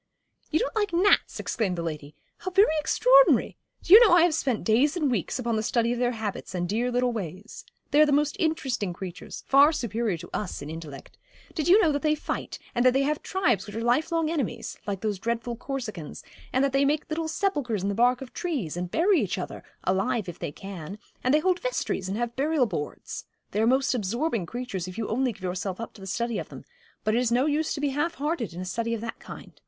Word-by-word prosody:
'You 315 - +2
don't 485 - -1
like 415 -3 0
gnats!' 380 +4 +3
exclaimed 195 -7 -1
the 170 - -2
lady; 150 -3 -6 0.2
'how 370 - -4
very 390 -2 +4
extraordinary. - - +4 0.3
Do 350 - +4
you 430 - +13
know 455 -6 +6
I 340 - +6
have 345 -2 +3
spent 265 -7 -1
days 265 +9 +3
and 295 -6 +1
weeks 215 -1 -1
upon 235 -3 -1
the - - 0
study 235 +1 +1
of 240 - -4
their 245 0 +1
habits 215 -4 -5
and 175 0 -1
dear 235 +6 0
little 245 0 +1
ways. 200 0 -7 0.3
They 295 +1 +5
are - - +8
the - - +1
most 295 +1 +2
interesting 265 - -1
creatures 180 0 -8
far 280 +3 +6
superior 230 - -1
to 170 - -10
us 205 - -3
in 145 +2 -7
intellect. 155 -4 -9 0.3
Do - - -2
you 350 +7 +6
know 335 -7 +4
that 285 -1 -1
they 305 -1 +2
fight, 300 - -4 0.2
and 240 - +1
that 255 -1 +5
they 270 +1 +2
have 295 +2 -1
tribes 245 - 0
which 205 - -8
are 225 - -3
life 255 +8 +2
long 325 -1 +1
enemies 240 -7 -3
like 195 -2 -3
those 210 -3 -2
dreadful 235 +2 -2
Corsicans 230 - -6 0.3
and 260 - +2
that 275 - -1
they 275 +1 +3
make 295 +2 +1
little 320 0 -2
sepulchres 290 - -1
in 200 - 0
the - - 0
bark 245 +4 +3
of 250 - -13
trees, 275 - -3
and 175 0 -3
bury 345 - +3
each 195 -3 -2
other 185 - -6 0.2
alive, 195 +4 0
if 175 - -7
they - - -4
can; 190 +1 -8 0.3
and 255 - +2
they 300 - +5
hold 365 +1 +2
vestries, 350 - -2
and 200 - -2
have 240 0 -2
burial 290 0 +2
boards. 165 -9 -5 0.3
They 210 - 0
are 225 - +3
most 265 +2 +3
absorbing 230 - -1
creatures, 235 -7 -4
if 185 - -8
you 225 - -2
only 255 +3 +1
give 195 -3 -14
yourself 185 +1 -3
up 230 - -6
to 200 - -15
the 195 - -8
study 235 +4 -1
of - - -7
them; - - -11 0.4
but 215 - +1
it 235 - +3
is 245 -2 0
no 250 +3 +3
use 305 +1 0
to - - -5
be 290 0 +1
half 300 +5 -1
hearted 295 - -2
in 180 - -5
a - - -5
study 230 +5 -2
of 220 - -6
that 230 - -6
kind. - - -11
240 Hz, 240 wpm, -26 LUFS, 200-300 Hz, 0.4 s, you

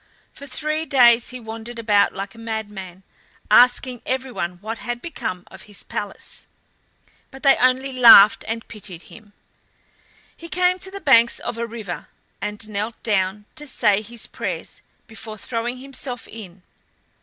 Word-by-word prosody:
For 280 - -11
three 305 +3 -2
days 240 -3 +5
he 255 - -7
wandered 225 +1 -8
about 210 -3 +3
like 195 +1 -6
a 230 - -15
madman, 210 -5 -6 0.5
asking 245 0 +4
everyone 255 -9 -3
what 220 +5 -6
had 240 0 -4
become 185 - -5
of - - -13
his 205 - -9
palace, - - -7 0.8
but 270 +2 -13
they 275 -1 +6
only 260 +1 +2
laughed 230 -5 +8
and 225 0 -4
pitied 190 -5 -7
him. 210 -2 -16 1.0
He 335 - -11
came 365 +1 +2
to 380 - -2
the 395 +1 -8
banks 235 -4 +5
of - - -5
a 235 - -2
river, 210 -9 -7 0.3
and 210 +1 -5
knelt 215 +2 -3
down 200 -1 0
to 295 -1 -6
say 210 -6 +2
his 230 +1 -6
prayers - - -6 0.2
before 220 -1 -9
throwing 235 +4 -3
himself 255 -2 -7
in. 190 -5 -11
230 Hz, 150 wpm, -22 LUFS, 210-255 Hz, 1.0 s, laughed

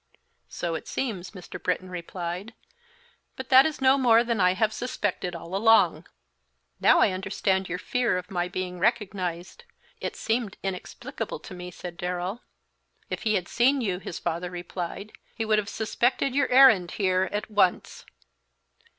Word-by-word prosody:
"So 170 -1 -3
it 160 - -5
seems," 200 -9 -3
Mr. 185 -4 -10
Britton 185 0 -2
replied; 180 +4 -5 0.8
"but 260 0 -7
that 265 +2 +8
is 310 - -5
no 265 +1 +5
more 235 -2 +5
than 230 -4 -1
I 180 0 +4
have 215 +2 +1
suspected 205 -7 -3
all 170 +2 -7
along." 225 +3 +4 0.7
"Now - - +5
I 205 - +4
understand 190 0 -1
your 180 - -2
fear 240 +1 0
of 180 - -7
my 175 -1 -1
being 180 0 -5
recognized; 195 - -2 0.4
it - - -4
seemed 225 -3 -2
inexplicable 190 -2 -5
to - - -10
me," 180 0 -7
said 175 -1 -9
Darrell. 180 +5 -3 0.7
"If - - -3
he 215 - +3
had 180 -3 -1
seen 265 +4 +3
you," 195 -7 -1
his 180 - -6
father 170 +2 -3
replied, 180 +3 -6 0.2
"he 225 - -2
would 215 -1 +3
have 210 0 -4
suspected 245 +5 0
your 280 0 +2
errand 250 -9 +6
here 185 -2 +1
at 210 +1 -4
once." 200 -4 +1
195 Hz, 160 wpm, -26 LUFS, 180-230 Hz, 0.8 s, that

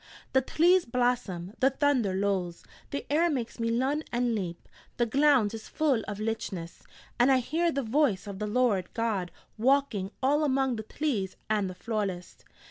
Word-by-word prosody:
The 265 - +5
tlees 340 +1 +3
blossom, 235 -8 -1
the 265 - +5
thunder 265 -8 +1
lolls, 190 -3 -1 0.3
the 280 - -4
air 335 +3 +4
makes 250 -6 -3
me 230 0 0
lun 265 +6 0
and 240 0 +1
leap, 180 -5 -4 0.3
the 240 - +2
glound 265 -3 +3
is 220 -1 -7
full 290 -7 +1
of 205 -2 -4
lichness, 205 -6 -4 0.4
and 245 +3 +5
I 265 - +5
hear 325 +7 0
the 275 -2 -2
voice 230 -4 +1
of 200 -2 -7
the 210 - -2
Lord 210 -5 +1
God 220 -6 -1 0.3
walking 250 -6 +2
all 290 +3 +3
among 265 -3 +1
the 220 - -5
tlees 215 -6 -2 0.2
of 210 -3 +1
the 185 - -7
folests.' 195 -3 -4
235 Hz, 170 wpm, -28 LUFS, 200-275 Hz, 0.4 s, The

